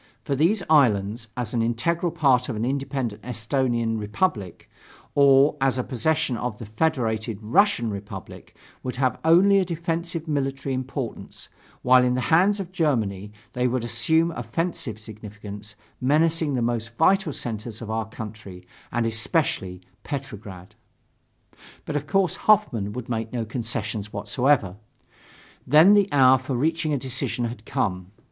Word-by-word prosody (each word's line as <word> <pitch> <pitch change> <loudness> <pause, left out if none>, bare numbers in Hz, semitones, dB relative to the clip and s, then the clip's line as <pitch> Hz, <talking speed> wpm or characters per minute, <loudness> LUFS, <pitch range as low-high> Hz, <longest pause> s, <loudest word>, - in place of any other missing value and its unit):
For 140 - -1
these 175 +8 +2
islands, 115 -6 +3
as 120 -3 -3
an 120 - +1
integral 160 +10 0
part 135 -6 +2
of 120 - -3
an 110 +2 -2
independent 135 -5 -3
Esthonian 115 0 -1
Republic, 105 - -2 0.5
or 140 +1 +5
as 135 -1 +2
a 125 - 0
possession 140 +2 0
of 120 -3 -4
the 115 - -8
Federated 110 -3 -1
Russian 115 - +2
Republic 100 -2 -9 0.3
would 125 - -5
have 130 0 0
only 185 +5 +5
a - - +2
defensive 170 -1 -3
military 135 -2 -2
importance, 130 -1 -5 0.3
while 125 0 +6
in 125 0 +2
the 130 +5 -1
hands 195 +5 +4
of 185 -2 -5
Germany 110 - -1 0.2
they 125 0 +1
would 125 -1 -1
assume 160 +9 +2
offensive 120 - -3
significance, 105 -1 -10 0.3
menacing 155 +2 +2
the 120 - 0
most 115 -1 -3
vital 190 0 +3
centers 110 -3 -5
of 110 -2 -6
our 110 -1 -2
country, 105 -5 -9 0.3
and 120 -1 0
especially 110 - -1 0.2
Petrograd." 105 - -7 1.1
But, 150 - -4
of 145 0 -2
course, 195 -2 +1
Hoffmann 140 - +3
would 125 -1 -6
make 115 -2 -3
no 120 -2 -2
concessions 110 -2 -3
whatsoever. 120 -3 +1 0.9
Then 155 +9 +7
the 205 -1 +4
hour 130 -2 +6
for 130 +1 -4
reaching 160 +4 0
a 145 - +1
decision 125 -1 -2
had 115 -1 -7
come. 90 -3 -2
125 Hz, 145 wpm, -24 LUFS, 110-155 Hz, 1.1 s, Then